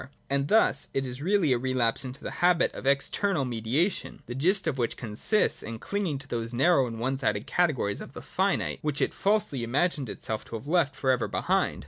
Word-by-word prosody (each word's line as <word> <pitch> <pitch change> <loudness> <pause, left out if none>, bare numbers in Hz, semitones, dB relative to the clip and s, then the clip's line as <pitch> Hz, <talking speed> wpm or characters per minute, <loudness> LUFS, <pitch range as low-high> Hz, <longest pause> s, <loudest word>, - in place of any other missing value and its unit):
And 140 0 +1
thus 145 -9 +3
it 135 - 0
is 125 +1 -6
really 175 -4 +2
a 120 - 0
relapse 125 -2 0
into 130 0 -8
the - - -4
habit 175 -1 +3
of 135 - -6
external 140 +4 +1
mediation, 125 - -1
the 120 - -6
gist 185 +9 +2
of 145 -5 -1
which 120 - -1
consists 120 - +2
in 115 0 -6
clinging 190 - -2
to 135 0 -9
those 115 -1 -4
narrow 135 0 +4
and 115 -1 -6
one 130 +3 -1
sided 105 -5 -1
categories 145 -13 +1
of - - -9
the - - -8
finite, - - -1
which 150 -2 -1
it - - +1
falsely 200 - 0
imagined 140 +2 0
itself 110 +1 -4
to - - -7
have 115 - -7
left 150 -3 +1
for 130 -1 +1
ever 125 -2 0
behind. - - 0
135 Hz, 205 wpm, -27 LUFS, 120-170 Hz, -, narrow